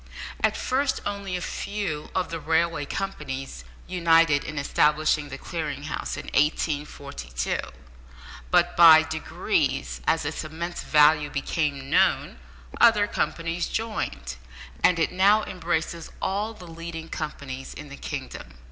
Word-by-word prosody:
At -, -, +2 dB
first 270 Hz, +2 st, 0 dB
only 200 Hz, -2 st, -3 dB
a -, -, -6 dB
few 195 Hz, -5 st, -4 dB
of 185 Hz, -2 st, -1 dB
the 165 Hz, -, -3 dB
railway 160 Hz, 0 st, +1 dB
companies 135 Hz, -, -5 dB, 0.2 s
united 165 Hz, -4 st, +4 dB
in 155 Hz, -, -6 dB
establishing 150 Hz, +1 st, +2 dB
the 135 Hz, -, -6 dB
Clearing 150 Hz, -3 st, -4 dB
House 155 Hz, -, -4 dB
in -, -, -6 dB
1842, 145 Hz, -, -1 dB, 0.9 s
but 175 Hz, -1 st, +3 dB
by 160 Hz, -2 st, +9 dB
degrees, 65 Hz, -, -1 dB
as 160 Hz, -2 st, +2 dB
its 150 Hz, +2 st, -3 dB
immense 170 Hz, +3 st, -5 dB
value 150 Hz, -1 st, +4 dB
became 140 Hz, -1 st, -2 dB
known, 190 Hz, +3 st, +2 dB, 0.4 s
other 225 Hz, -3 st, +6 dB
companies 165 Hz, -3 st, -2 dB
joined, 210 Hz, -, -3 dB, 0.5 s
and 180 Hz, -, +5 dB
it 165 Hz, -, +1 dB
now 200 Hz, +4 st, +4 dB
embraces 170 Hz, -2 st, -3 dB
all 210 Hz, +3 st, -2 dB
the 180 Hz, -, -12 dB
leading 165 Hz, 0 st, -7 dB
companies 140 Hz, -5 st, -6 dB
in 150 Hz, -1 st, -9 dB
the 140 Hz, -, -8 dB
kingdom. -, -, -7 dB
160 Hz, 130 wpm, -25 LUFS, 145-180 Hz, 0.9 s, by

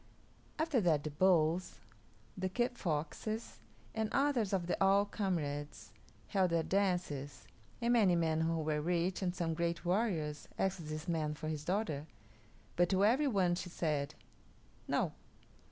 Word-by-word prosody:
After 310 Hz, -6 st, +2 dB
that 160 Hz, -6 st, +2 dB
the 155 Hz, -, -3 dB
Bulls, 170 Hz, +1 st, +2 dB, 0.6 s
the 185 Hz, 0 st, -2 dB
Kit 240 Hz, +5 st, 0 dB
Foxes, 195 Hz, +5 st, -3 dB, 0.3 s
and 220 Hz, -1 st, -1 dB
others 270 Hz, -7 st, +2 dB
of 190 Hz, -3 st, 0 dB
the 175 Hz, -, 0 dB
All 195 Hz, +1 st, +5 dB
Comrades 150 Hz, -9 st, -3 dB, 0.4 s
held 190 Hz, -3 st, +2 dB
their 165 Hz, -1 st, +1 dB
dances, 180 Hz, -8 st, -1 dB, 0.3 s
and 235 Hz, 0 st, +2 dB
many 205 Hz, -7 st, +5 dB
men 160 Hz, -1 st, +1 dB
who 165 Hz, 0 st, +1 dB
were 150 Hz, -1 st, 0 dB
rich 175 Hz, +3 st, 0 dB
and 180 Hz, -1 st, -1 dB
some 170 Hz, -3 st, -1 dB
great 170 Hz, +1 st, -2 dB
warriors 175 Hz, -6 st, 0 dB
asked 190 Hz, -4 st, -1 dB
this 155 Hz, +2 st, -5 dB
man 155 Hz, -3 st, -1 dB
for 155 Hz, +1 st, -5 dB
his 155 Hz, -2 st, -3 dB
daughter, 160 Hz, -5 st, -1 dB, 0.7 s
but 175 Hz, 0 st, +3 dB
to 195 Hz, +1 st, +3 dB
every 265 Hz, +7 st, +4 dB
one 190 Hz, -8 st, +2 dB
she 180 Hz, +1 st, -4 dB
said, 150 Hz, -5 st, -1 dB, 0.7 s
"No." -, -, 0 dB
175 Hz, 150 wpm, -34 LUFS, 155-200 Hz, 0.7 s, All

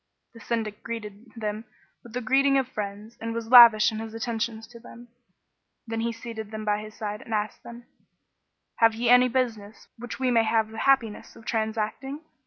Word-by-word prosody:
The 230 Hz, -, -13 dB
Syndic 220 Hz, -2 st, -3 dB
greeted 220 Hz, -1 st, -8 dB
them 215 Hz, -1 st, -4 dB, 0.4 s
with 235 Hz, -, -15 dB
the 250 Hz, -, -3 dB
greeting 275 Hz, +3 st, +3 dB
of 265 Hz, -2 st, 0 dB
friends 210 Hz, -1 st, -7 dB
and 230 Hz, 0 st, -4 dB
was 230 Hz, -1 st, -5 dB
lavish 230 Hz, -4 st, +9 dB
in 220 Hz, -, -5 dB
his 225 Hz, 0 st, -7 dB
attentions 225 Hz, -1 st, -3 dB
to 235 Hz, -1 st, -13 dB
them: 240 Hz, 0 st, -14 dB, 0.8 s
then 225 Hz, -1 st, -4 dB
he 235 Hz, +1 st, -1 dB
seated 230 Hz, -2 st, -8 dB
them 215 Hz, 0 st, -6 dB
by 210 Hz, 0 st, 0 dB
his 215 Hz, 0 st, -11 dB
side 210 Hz, 0 st, -5 dB
and 225 Hz, -, -4 dB
asked 210 Hz, 0 st, -3 dB
them, 235 Hz, 0 st, -11 dB, 0.9 s
"Have 225 Hz, -1 st, +4 dB
ye 235 Hz, +1 st, 0 dB
any 250 Hz, +1 st, +7 dB
business 225 Hz, -5 st, -3 dB
which 245 Hz, 0 st, -7 dB
we[FN#15] 255 Hz, -2 st, 0 dB
may 230 Hz, -1 st, +4 dB
have 220 Hz, 0 st, +1 dB
the 220 Hz, 0 st, -8 dB
happiness 230 Hz, -6 st, +1 dB
of 225 Hz, -, -15 dB
transacting?" 225 Hz, +6 st, -3 dB
225 Hz, 190 wpm, -26 LUFS, 215-240 Hz, 0.9 s, lavish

